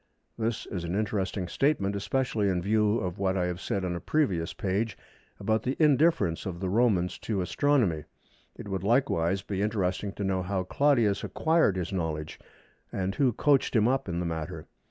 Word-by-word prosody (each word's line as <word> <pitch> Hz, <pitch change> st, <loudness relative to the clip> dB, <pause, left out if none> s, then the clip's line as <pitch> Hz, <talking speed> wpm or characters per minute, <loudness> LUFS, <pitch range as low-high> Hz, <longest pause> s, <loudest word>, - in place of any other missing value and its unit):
This 115 Hz, 0 st, -2 dB
is 90 Hz, -3 st, -5 dB
an 85 Hz, +2 st, -3 dB
interesting 100 Hz, -3 st, -1 dB
statement, 100 Hz, -, +1 dB
especially 110 Hz, -1 st, 0 dB
in 90 Hz, -2 st, +1 dB
view 105 Hz, +3 st, +2 dB
of 90 Hz, -2 st, -4 dB
what 95 Hz, -1 st, +1 dB
I 90 Hz, -, +1 dB
have 90 Hz, +1 st, -3 dB
said 95 Hz, -2 st, -2 dB
on 90 Hz, -1 st, -2 dB
a -, -, -3 dB
previous 90 Hz, -, 0 dB
page 100 Hz, +3 st, -2 dB, 0.4 s
about 110 Hz, 0 st, +1 dB
the 130 Hz, +3 st, -2 dB
indifference 150 Hz, -, +3 dB
of 85 Hz, -2 st, -5 dB
the 95 Hz, 0 st, -2 dB
Romans 100 Hz, -4 st, +2 dB
to 105 Hz, -4 st, -2 dB
Astronomy. 95 Hz, -, +1 dB, 0.5 s
It -, -, -9 dB
would, 95 Hz, -2 st, -2 dB
likewise, 95 Hz, -5 st, +1 dB
be 100 Hz, -1 st, -3 dB
interesting 100 Hz, -2 st, -1 dB
to 100 Hz, -, -5 dB
know 95 Hz, -1 st, 0 dB
how 95 Hz, 0 st, -1 dB
Claudius 120 Hz, -2 st, +2 dB
acquired 160 Hz, -, +2 dB
his 90 Hz, 0 st, -3 dB
knowledge, 80 Hz, -4 st, -3 dB, 0.5 s
and 95 Hz, 0 st, -2 dB
who 130 Hz, +1 st, +2 dB
coached 140 Hz, +2 st, +2 dB
him 110 Hz, 0 st, +4 dB
up 130 Hz, -5 st, 0 dB
in 85 Hz, 0 st, -2 dB
the 90 Hz, -, -2 dB
matter. 80 Hz, -2 st, -4 dB
100 Hz, 180 wpm, -28 LUFS, 90-115 Hz, 0.5 s, him